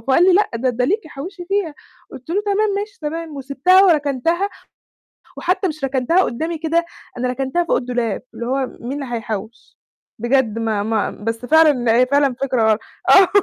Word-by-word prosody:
قال 345 - +5
لي: 375 - +5
"لأ، 415 +3 +3
ده 255 +2 0
ده 250 +1 0
ليكِ 400 - -1
حوِّشي 355 +6 -8
فيها."، 385 -5 -1 0.4
قلت 265 +2 -12
له: 385 +5 0
"تمام، 415 +1 +1
ماشي، 415 +1 -6
تمام."، 315 0 -5
وسِبتها 280 +8 +3
وركنتها، 330 +3 +1 0.9
وحتى 370 +2 0
مش 305 -4 -5
ركنتها 270 +7 +2
قدَّامي 320 +6 -3
كده، 330 +2 0 0.3
أنا 250 +1 -1
ركنتها 270 +7 -1
فوق - - +1
الدولاب، 245 -4 -2
اللي 235 - -5
هو 265 +1 0
مين 275 +4 -5
اللي 245 -3 -5
هيحوِّش؟ 225 0 -7 0.4
بجد 240 -1 +1
ما 220 -3 -1
ما 220 0 0
بس 225 +3 -5
فعلًا 290 -6 +4
هي 255 +1 +4
فعلًا 280 -1 +2
فكرة 255 -4 +1
غل 215 - 0 0.3
آه، 385 -2 +8
275 Hz, 175 wpm, -19 LUFS, 245-340 Hz, 0.9 s, آه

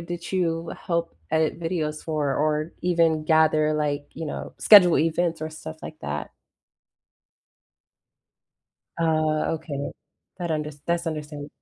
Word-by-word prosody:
did 170 0 -6
you 165 -3 0
help 170 - -1 0.2
edit 160 +1 +1
videos 160 -3 -2
for, 150 -4 -1
or, 155 +2 0
even, 165 -3 +2
gather, 155 -1 +4
like, 145 -1 -1
you 165 - -6
know, - - -6
schedule 185 -5 +8
events 165 0 +1
or 155 - -3
stuff 155 0 -8
like 155 - -8
that? 75 0 -4 2.7
Uh, 155 -1 +1
okay. 150 -3 -4 0.5
That 175 -1 -3
under 150 -1 -1 0.2
that's 170 0 0
understand 150 -2 -5
160 Hz, 125 wpm, -25 LUFS, 150-170 Hz, 2.7 s, schedule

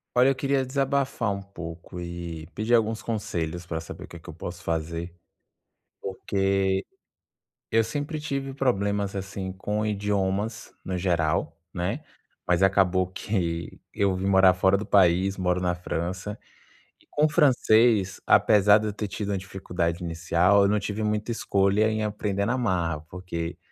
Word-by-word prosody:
Olha, 125 +2 +6
eu 135 - +3
queria 135 0 +1
desabafar 135 -4 0
um 100 - -4
pouco 85 -3 -9
e 85 -2 -6
pedir 110 +3 +1
alguns 110 -1 +2
conselhos 85 -6 -3
pra 80 -2 -4
saber 80 - -9
o - - -7
que - - -10
que - - -17
eu - - -7
posso 90 0 -7
fazer, 85 +1 -3 0.9
porque 95 0 0 0.8
eu 115 0 +3
sempre 145 +7 -3
tive 140 -2 -3
problemas, 100 -6 0
assim, 95 -1 -5
com 105 +3 -2
idiomas, 105 +1 -1
no 95 -1 -2
geral, 85 -3 0
né, 95 +10 -2 0.5
mas, 90 +1 +3
acabou 95 -1 +3
que 90 -3 -3
eu 100 -2 +1
vim 95 +1 -3
morar 95 -1 +6
fora 95 +2 +3
do 105 - -4
país, 95 0 +3
moro 90 -1 +1
na 90 -1 0
França, 90 +4 -4 0.6
e - - -27
com 150 - +2
o - - +2
francês, 115 -8 +3
apesar 105 -1 +6
de 110 - -2
eu 105 - -3
ter 105 +1 -4
tido 100 +1 -4
uma 100 - 0
dificuldade 90 -2 -3
inicial, 85 +4 +3
eu - - +4
não 105 +1 +2
tive 105 +1 -4
muita 105 +2 -1
escolha, 100 0 +2
em 110 0 -1
aprender 105 -1 -1
na 125 +4 0
marra, 85 -9 0
porque 90 -2 -5
95 Hz, 160 wpm, -26 LUFS, 90-110 Hz, 0.9 s, Olha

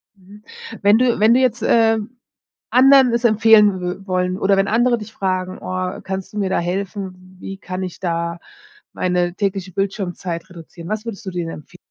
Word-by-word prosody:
Mhm. 200 +2 -17 0.4
Wenn 205 +2 +5
du 245 -2 +2
wenn 220 +2 +5
du 250 - +4
jetzt, 245 -3 +1
ähm, 225 +1 +2 0.5
anderen 265 -1 +6
es 235 0 0
empfehlen 215 -3 +5
wü 180 +2 -5
wollen 185 0 -1
oder 195 0 +2
wenn 195 +1 +2
andere 240 +2 +2
dich 220 0 -10
fragen: 185 -2 -2
„Oh, 185 0 -4
kannst 190 +1 -5
du 210 - -7
mir 195 -2 0
da - - +1
helfen? 185 0 -5
Wie 195 +1 -7
kann 185 -1 -5
ich 180 -2 -7
da 170 -1 -2 0.5
meine 180 -1 -1
tägliche 195 -2 -2
Bildschirmzeit 185 -2 -3
reduzieren?“ 170 0 -11
Was 215 +1 -3
würdest 230 -1 -7
du - - -3
dir 180 -1 -3
denen 165 -2 -7
empfe 180 - -19
195 Hz, 185 wpm, -20 LUFS, 185-220 Hz, 0.5 s, anderen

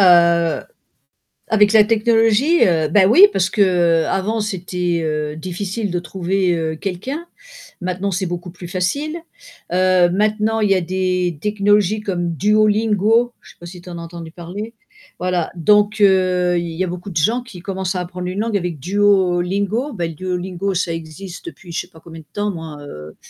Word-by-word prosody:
Heu, 170 -3 +4 0.9
avec 210 -1 +4
la 220 -1 +7
technologie? 225 +7 +3
Heu, 160 -4 +2
bah 190 +4 +4
oui 355 - +8
parce 190 0 +1
qu'avant 185 +2 +2
c'était, 180 -4 -2
heu, 150 -1 -2
difficile 185 +5 -4
de 175 - -1
trouver, 180 +2 -1
heu, 160 -1 -2
quelqu'un, 255 - -5 0.5
maintenant 185 +2 -2
c'est 190 0 -2
beaucoup 175 +1 -5
plus 175 0 -10
facile. 205 - -2 0.6
Heu, 185 -1 +4
maintenant 215 +3 +1
il 210 -2 +1
y - - +6
a 185 - +1
des 180 -1 -1
technologies 205 +1 +2
comme 175 -4 -2
Duolingo, 215 +4 +2
je - - -17
sais - - -18
pas 175 - -10
si 175 +1 -10
tu 175 - -14
en 170 - -7
as 170 - -7
entendu 165 -1 -9
parler? 190 +7 -7 0.4
Voilà, 180 -2 -1
donc 210 +5 +3
heu, 185 -3 +3
il 170 0 -3
y 170 +3 -1
a - - -2
beaucoup 180 +2 -6
de 170 - -10
gens 225 +11 +2
qui 230 -7 -12
commencent 190 0 -3
à 180 - -2
apprendre 180 0 -6
une 185 +3 -3
langue 220 -1 -1
avec 175 -4 -3
Duolingo. 200 - +1
Bah, 175 -5 -2
Duolingo 180 +3 -3
ça 175 -1 -1
existe 165 - -8
depuis 190 - -10
je - - -1
sais - - -17
pas 160 - -17
combien 165 0 -11
de 155 - -18
temps 205 0 -1
moi, 160 -5 -7
heu 75 - -10
185 Hz, 180 wpm, -19 LUFS, 175-210 Hz, 0.9 s, oui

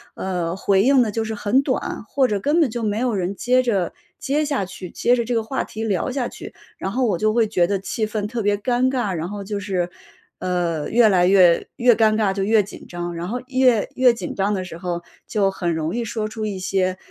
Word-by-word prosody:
呃， 180 -3 -2
回 195 0 +2
应 265 +2 +5
得 220 - -2
就 225 +2 -1
是 220 0 -4
很 215 +6 +2
短， 275 -5 -2
或 265 +2 +1
者 205 -4 -1
根 295 - +1
本 300 -8 +3
就 235 0 -4
没 210 -1 -1
有 245 0 0
人 190 0 -2
接 250 +5 +2
着 205 -8 0 0.3
接 295 +3 0
下 280 -9 -1
去， 180 -1 -9
接 245 - +2
着 235 - 0
这 240 +1 -2
个 225 - +1
话 265 +4 -2
题 220 - -6
聊 200 -3 0
下 255 -2 -2
去。 - - -10 0.2
然 190 - -3
后 255 +4 +1
我 195 -7 0
就 215 0 +2
会 230 -2 +3
觉 180 -5 +2
得 200 +1 0
气 215 +3 -2
氛 215 -1 -3
特 235 +2 -3
别 205 0 +1
尴 245 +4 +1
尬， 245 -7 -1
然 170 0 -3
后 205 0 -6
就 205 +1 -4
是， 185 -3 -2 0.5
呃， 175 -4 -1
越 235 0 +5
来 180 -3 +4
越 180 -3 +5
越 245 0 +5
尴 220 -1 +3
尬 210 -3 +1
就 195 - -3
越 210 +2 +3
紧 195 - -11
张， 175 0 -5
然 170 +1 -5
后 240 +6 -3
越 255 -4 +3
越 255 -1 +5
紧 185 -6 -5
张 200 +1 0
的 185 -1 -3
时 175 - -8
候 175 -1 -3 0.2
就 200 -3 +1
很 175 -3 -2
容 160 +3 -2
易 240 - -1
说 220 -1 -3
出 215 0 -4
一 200 -2 -4
些 185 0 0
210 Hz, 265 characters per minute, -22 LUFS, 185-240 Hz, 0.5 s, 应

